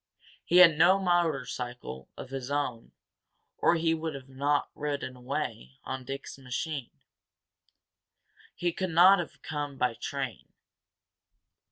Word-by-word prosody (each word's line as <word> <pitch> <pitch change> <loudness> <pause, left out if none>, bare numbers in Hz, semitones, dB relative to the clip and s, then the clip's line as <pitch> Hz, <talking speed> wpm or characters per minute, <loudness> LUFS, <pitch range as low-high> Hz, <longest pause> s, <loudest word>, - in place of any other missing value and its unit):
He 175 - +3
had 165 -4 +8
no 185 +4 +7
motorcycle 135 - -1
of - - -8
his 135 -1 -5
own 140 -5 -2 0.7
or 170 - +4
he 165 0 +2
would 155 -5 -4
not 140 +2 0
have - - -48
ridden 145 -3 -3
away 125 - -4
on 130 -1 -5
Dick's 135 +1 -7
machine. 135 +1 -4 1.7
He 175 0 0
could 185 +2 -3
not 180 +4 +7
have 170 - -6
come 145 -2 -4
by 125 -2 +1
train. 135 0 -5
145 Hz, 125 wpm, -29 LUFS, 130-165 Hz, 1.7 s, had